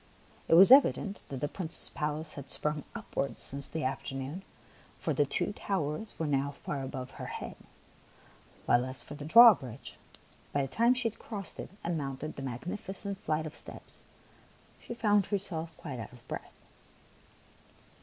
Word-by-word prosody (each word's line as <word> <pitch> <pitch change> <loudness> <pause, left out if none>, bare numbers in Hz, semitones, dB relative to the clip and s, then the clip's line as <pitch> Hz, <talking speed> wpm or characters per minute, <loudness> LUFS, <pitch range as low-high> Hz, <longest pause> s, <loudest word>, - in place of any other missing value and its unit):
It - - +6
was 190 +7 +9
evident 220 -7 +6
that 135 -2 -5
the 145 - +1
Prince's 165 +1 +1
palace 150 +1 -3
had 140 -1 -9
sprung 150 -1 0
upwards 135 - -3
since 140 0 -2
the 160 - -3
afternoon, 135 +5 -3 0.6
for - - -1
the - - +2
two - - -1
towers 190 +2 -3
were 165 - -1
now 140 -1 +1
far 140 0 -4
above 130 -1 -5
her - - -7
head, - - -6 1.1
while 120 - +4
as 130 0 -8
for - - -9
the 145 0 -7
drawbridge, 160 - +6 0.6
by 140 - +2
the - - -2
time 235 - +3
she 250 -2 +1
had 225 - -6
crossed 200 -4 -6
it - - -5
and 170 -2 -1
mounted 140 +2 -5
the - - -7
magnificent 190 - -4
flight 155 -2 -1
of 155 - -7
steps, - - -9 0.8
she 235 - -7
found 210 -4 +3
her 205 - +1
self 165 -4 -3
quite 140 -6 -6
out 110 - -7
of 120 -1 -16
breath. - - -7
155 Hz, 165 wpm, -31 LUFS, 135-195 Hz, 1.1 s, was